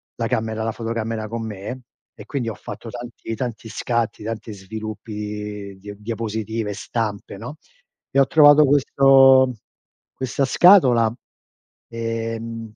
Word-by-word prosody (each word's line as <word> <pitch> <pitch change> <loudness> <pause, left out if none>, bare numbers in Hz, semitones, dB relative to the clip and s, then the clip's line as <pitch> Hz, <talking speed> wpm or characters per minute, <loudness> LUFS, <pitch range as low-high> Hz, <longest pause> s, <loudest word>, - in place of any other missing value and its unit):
la - - -2
camera, 110 0 -2
la 115 - -1
fotocamera 115 -1 -3
con 115 +1 -4
me, 110 +5 -6 0.3
e - - -12
quindi 135 -5 -3
ho 110 - -4
fatto 115 - -9
tanti 120 -1 -7
tanti 115 -2 -5
scatti, 115 -1 -2
tanti 110 0 -5
sviluppi 110 +3 -7
di 105 -1 -6
dia 100 +1 -9
diapositive, 110 0 -3
e - - -4
stampe, 105 -2 -4
no? 125 +9 -8 0.5
E 140 - +3
ho 135 - +5
trovato 145 +1 +7
questo 135 -2 +5 0.6
questa 130 +1 -1
scatola, 130 - +6 0.8
ehm 115 0 -4
115 Hz, 130 wpm, -22 LUFS, 110-125 Hz, 0.8 s, trovato